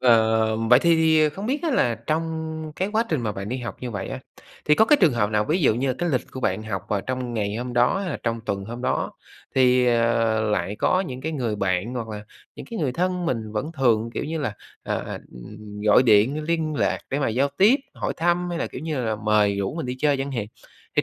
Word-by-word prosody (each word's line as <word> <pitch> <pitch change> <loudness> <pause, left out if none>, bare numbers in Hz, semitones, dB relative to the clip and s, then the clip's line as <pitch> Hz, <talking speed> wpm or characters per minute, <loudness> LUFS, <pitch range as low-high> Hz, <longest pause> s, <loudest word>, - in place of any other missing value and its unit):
Ờ, 110 -2 +4
vậy 115 +2 +5
thì 170 +3 +3
thì 160 -1 +4
không 195 +8 -6
biết 280 +6 -1
á 330 - 0
là 120 - +2
trong 160 +7 -2 0.3
cái 190 - -1
quá 225 +2 +2
trình 155 -5 0
mà 110 -3 -2
bạn 100 0 -6
đi 125 - -2
học 120 -2 -6
như 125 - -4
vậy 100 -4 -4
á, - - -5 0.5
thì 150 - +5
có 220 - +5
cái 295 +7 +5
trường 165 -9 +5
hợp 105 -3 0
nào 105 0 +1
ví 160 - 0
dụ 110 - +4
như 130 +3 -1
là 130 - 0
cái 175 - 0
lịch 130 -6 -1
của 130 - -7
bạn 110 -3 0
học 105 -3 -4
vào 100 - 0
trong 125 +1 -4
ngày 105 -1 -1
hôm 125 +1 -4
đó, 120 +8 +3
hay 190 -3 -3
là - - -2
trong 115 -1 -1
tuần 100 -3 -3
hôm 120 +4 -7
đó, - - 0 0.4
thì, 125 -1 +4
ờ, 115 -2 +2
lại 100 0 -1
có 185 - +2
những 130 -9 -5
cái 160 +4 -3
người 120 -8 -2
bạn 95 +4 -1
hoặc 115 -3 -4
là 105 -1 -7 0.3
những - - -9
cái 230 - -4
người 140 -7 0
thân 180 +2 -1
mình 110 -7 -2
vẫn 130 +10 -3
thường, 115 -6 +2
kiểu - - -2
như 160 +2 -3
là, 140 -9 -2 0.3
ờ, - - -2 0.3
ừm, 105 - -10
gọi 105 +3 +5
điện 120 +6 +4
liên 160 -1 -1
lạc - - +1
để 140 - 0
mà 140 - +1
giao 130 +5 +1
tiếp, 215 +8 +6 0.2
hỏi - - -2
thăm 175 +1 +1
hay 170 - -3
là, - - -1
kiểu - - -8
như 155 -4 -2
là, 110 -1 -1
mời 105 -1 +2
rủ 100 +7 -2
mình 165 -6 -4
đi 125 - -4
chơi 145 0 +2
chẳng 135 +1 -3
hạn? 115 -5 -2 0.5
Thì - - +4
125 Hz, 255 wpm, -24 LUFS, 110-155 Hz, 0.5 s, tiếp